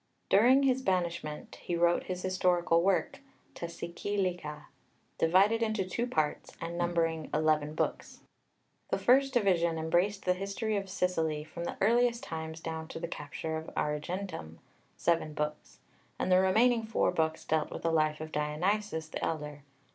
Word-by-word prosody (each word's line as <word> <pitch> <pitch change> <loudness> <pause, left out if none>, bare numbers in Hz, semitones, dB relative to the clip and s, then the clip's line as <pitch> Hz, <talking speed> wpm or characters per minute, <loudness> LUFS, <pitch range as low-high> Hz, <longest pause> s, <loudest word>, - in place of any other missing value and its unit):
During 250 +7 +6
his 260 -1 +2
banishment 170 -7 -2
he 175 - -2
wrote 170 0 +2
his 180 -1 -4
historical 180 -2 +2
work, 190 +1 +1 0.3
τὰ 170 0 -6
Σικελικά, 180 -6 -2 0.5
divided 195 +7 +4
into 215 -4 0
two 235 +6 -2
parts 155 -10 -2
and 165 +1 -5
numbering 165 -2 0
eleven 155 -1 +1
books. - - -3 0.7
The - - +1
first 270 +2 +4
division 180 -9 +2
embraced 175 +5 +1
the 180 - +4
history 200 +3 -2
of 195 -1 -2
Sicily 165 -5 0
from 170 +2 -7
the - - -4
earliest 235 +2 +3
times 160 0 -6
down 160 -1 -5
to - - -7
the 170 - -3
capture 160 +1 -5
of 160 - -7
Agrigentum 150 - -3 0.4
(seven 165 -3 +1
books), 150 0 -4 0.4
and 185 - -1
the 185 - +7
remaining 225 +5 +4
four 220 -4 +1
books 160 -2 -1
dealt 155 -1 +1
with - - -7
the 165 - +2
life 155 -1 +2
of 155 0 -6
Dionysius 160 +3 -1
the - - -5
elder. 150 -2 -3
170 Hz, 155 wpm, -31 LUFS, 160-195 Hz, 0.7 s, the